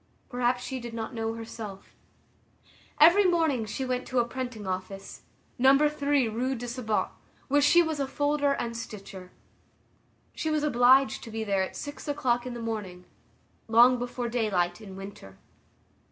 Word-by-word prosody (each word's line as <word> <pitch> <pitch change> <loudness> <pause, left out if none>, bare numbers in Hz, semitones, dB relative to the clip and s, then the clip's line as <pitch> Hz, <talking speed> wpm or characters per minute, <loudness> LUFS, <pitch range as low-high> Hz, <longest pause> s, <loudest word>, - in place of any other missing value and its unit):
Perhaps 245 0 0
she 260 0 -4
did 235 -1 -7
not 225 -1 -5
know 225 -1 -2
herself. 220 -3 -8 1.1
Every 345 +7 +7
morning 320 -10 +2
she 235 +6 -3
went 255 0 -2
to 255 - -3
a 240 - +4
printing 245 -4 -5
office, 190 +1 -5 0.4
No. 265 +2 +6
3 285 -3 +1
Rue 250 +5 -1
du 245 0 -6
Sabot, 235 -3 -1 0.4
where 290 +2 +4
she 345 +4 +6
was 320 -2 -3
a 275 - 0
folder 290 0 +1
and 235 -4 -3
stitcher. 195 -5 -8 1.0
She 315 - -3
was 305 -1 0
obliged 255 -2 +4
to - - -8
be 225 0 -4
there 200 -2 +1
at 190 - -3
six 290 +1 -7
o'clock 255 -4 0
in 245 - -5
the - - -6
morning—long 210 - 0
before 245 0 -3
daylight 210 -6 0
in 195 -3 -10
winter. 195 - -10
240 Hz, 155 wpm, -28 LUFS, 215-270 Hz, 1.1 s, Every